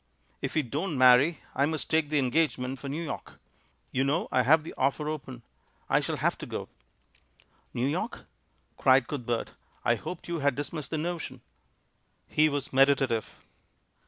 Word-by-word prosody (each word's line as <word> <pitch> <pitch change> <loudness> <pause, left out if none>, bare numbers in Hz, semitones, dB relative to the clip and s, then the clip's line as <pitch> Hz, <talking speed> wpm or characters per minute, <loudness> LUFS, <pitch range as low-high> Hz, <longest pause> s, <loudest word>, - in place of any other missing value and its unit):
"If - - -3
we 155 - +3
don't 150 +5 -3
marry, 130 +5 +6
I 140 +2 +2
must 155 0 -2
take 160 -2 +1
the 150 - +1
engage 145 +4 +2
ment 130 +1 -4
for 140 - -6
New 155 +5 -3
York; 155 - -6 0.6
you 130 - +1
know 145 +5 0
I 130 - +4
have 155 +5 +5
the 160 - -8
offer 140 +3 0
open 135 -6 -5 0.2
— - - -38
I - - +5
shall - - -2
have - - 0
to - - -6
go." - - -5 1.0
"New 120 - -1
York?" 175 - -2 0.5
cried 130 -2 +4
Cuthbert. 120 -5 -3 0.3
"I 120 - +5
hoped 150 +10 -6
you 170 -1 -2
had 140 -2 +2
dismissed 145 +1 -4
the 160 - -2
notion." 155 -6 -4 0.9
He 155 0 +3
was 145 -2 -3
meditative. 135 -4 +2
140 Hz, 170 wpm, -28 LUFS, 130-155 Hz, 1.0 s, marry